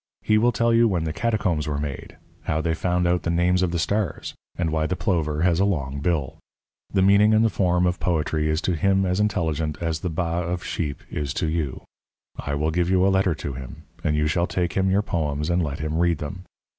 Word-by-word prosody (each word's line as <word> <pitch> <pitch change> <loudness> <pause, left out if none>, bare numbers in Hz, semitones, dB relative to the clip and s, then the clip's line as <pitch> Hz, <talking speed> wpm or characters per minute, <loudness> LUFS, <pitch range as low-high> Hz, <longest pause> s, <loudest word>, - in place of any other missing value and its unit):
He 110 0 +3
will 120 +2 +3
tell 115 -1 +1
you 115 0 +5
when 90 -6 0
the 80 -1 -2
catacombs 95 -10 0
were 75 -1 -1
made, 70 -2 -5 0.3
how 75 - 0
they 80 +1 0
found 90 +2 0
out 90 0 +2
the - - -2
names 90 +2 +2
of 90 - +2
the 85 - -2
stars, 100 +1 -1 0.2
and 85 -2 0
why 80 0 0
the 90 - -1
plover 80 -6 0
has 85 -1 +3
a - - +4
long 70 -9 -1
bill. 75 -3 -1 0.5
The 95 -2 +2
meaning 100 +2 +5
and 110 +1 +4
the 110 - +2
form 90 -1 +2
of 90 0 0
poetry 80 -2 0
is 80 +2 0
to 90 - 0
him 95 +4 +2
as 90 +1 0
intelligent 80 -7 0
as 80 -2 -2
the 90 - -3
baa 85 +1 -1
of 90 +1 -3
a - - -10
sheep 75 -5 -3
is 70 -3 -3
to - - 0
you. 80 -4 -2 0.5
I 70 - -3
will 75 +2 0
give 90 +1 0
you 95 0 +3
a - - +4
letter 95 -3 +2
to 70 -2 -5
him, 65 -1 -9 0.2
and 75 - +1
you 75 0 +1
shall 85 +3 +1
take 90 -2 -1
him 95 0 +1
your 100 +2 +2
poems 75 -3 -1
and 90 +1 +2
let 75 -3 -2
him 75 0 -2
read 85 -2 +2
them. 90 +6 -7
85 Hz, 240 wpm, -24 LUFS, 75-95 Hz, 0.5 s, you